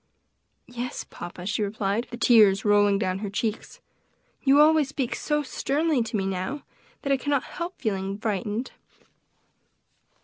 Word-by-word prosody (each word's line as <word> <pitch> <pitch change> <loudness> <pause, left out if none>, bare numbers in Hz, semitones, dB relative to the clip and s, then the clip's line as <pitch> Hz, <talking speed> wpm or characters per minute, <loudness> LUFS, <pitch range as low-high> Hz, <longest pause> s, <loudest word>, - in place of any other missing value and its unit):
"Yes, 245 +1 -5
papa," 175 +1 -9
she 205 +2 -1
replied, 210 +2 -1
the 240 - -7
tears 215 -5 +5
rolling 205 -1 +4
down 190 -2 -1
her 205 -1 -4
cheeks, 220 +1 -4 0.6
"you 275 +1 +5
always 305 -2 +5
speak 270 -3 -2
so 295 0 -1
sternly 290 +1 0
to 225 -1 -2
me 195 - -1
now, 195 +9 -3 0.4
that 280 -2 +1
I - - +3
cannot 285 0 0
help 345 +1 -6
feeling 195 -4 -2
frightened." 210 +3 -2
225 Hz, 140 wpm, -26 LUFS, 200-275 Hz, 0.6 s, tears